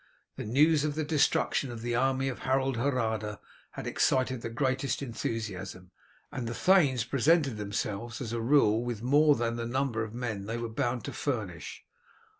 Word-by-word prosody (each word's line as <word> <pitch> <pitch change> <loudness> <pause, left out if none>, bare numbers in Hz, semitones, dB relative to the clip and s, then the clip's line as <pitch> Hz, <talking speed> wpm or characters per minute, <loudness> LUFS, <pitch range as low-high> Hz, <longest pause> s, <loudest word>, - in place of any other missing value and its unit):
The - - -6
news 145 +6 +4
of 150 -1 -1
the 155 - -1
destruction 145 -2 +1
of 115 -2 -7
the 120 0 -1
army 130 +2 +1
of 130 - -3
Harold 135 0 +1
Hardrada 110 -5 -1 0.3
had - - -6
excited 130 -2 +1
the 115 - -4
greatest 130 +4 -1
enthusiasm, 100 -7 -5 0.4
and 130 -5 -4
the 115 - -4
thanes 150 - +4
presented 140 +1 +2
themselves 105 +3 -3
as 120 -4 -4
a 115 - -1
rule 115 -3 +4
with 120 -3 -4
more 145 +3 +5
than 115 -1 -1
the 115 0 -3
number 125 -3 -1
of 110 +1 -7
men 110 -5 -4
they 115 +1 -2
were 115 -1 -4
bound 120 +1 -1
to - - -5
furnish. 105 - -4
120 Hz, 175 wpm, -29 LUFS, 110-135 Hz, 0.4 s, more